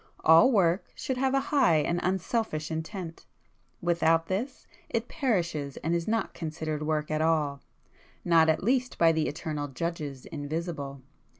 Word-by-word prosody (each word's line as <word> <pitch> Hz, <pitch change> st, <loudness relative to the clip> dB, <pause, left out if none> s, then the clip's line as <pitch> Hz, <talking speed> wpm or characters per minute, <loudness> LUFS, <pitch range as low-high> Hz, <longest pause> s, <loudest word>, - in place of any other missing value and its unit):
All 165 Hz, +10 st, +7 dB
work 185 Hz, -4 st, +2 dB
should 260 Hz, -3 st, -3 dB
have 265 Hz, +1 st, +1 dB
a -, -, +4 dB
high 270 Hz, -, +5 dB
and 170 Hz, +3 st, +1 dB
unselfish 185 Hz, -3 st, -1 dB
intent,—without 165 Hz, -1 st, -2 dB
this, 220 Hz, +10 st, -3 dB, 0.2 s
it 230 Hz, +1 st, -2 dB
perishes 170 Hz, -, -1 dB
and 165 Hz, +3 st, -2 dB
is 170 Hz, -1 st, -1 dB
not 225 Hz, +1 st, 0 dB
considered 155 Hz, -2 st, -4 dB
work 150 Hz, 0 st, -1 dB
at 155 Hz, 0 st, 0 dB
all,—not 160 Hz, +2 st, 0 dB
at 160 Hz, +2 st, +1 dB
least 250 Hz, +3 st, +1 dB
by 165 Hz, -1 st, +5 dB
the 160 Hz, -1 st, 0 dB
eternal 150 Hz, -1 st, -4 dB
judges 145 Hz, -2 st, -4 dB
invisible. 145 Hz, -2 st, -5 dB
165 Hz, 135 wpm, -28 LUFS, 155-190 Hz, 0.2 s, All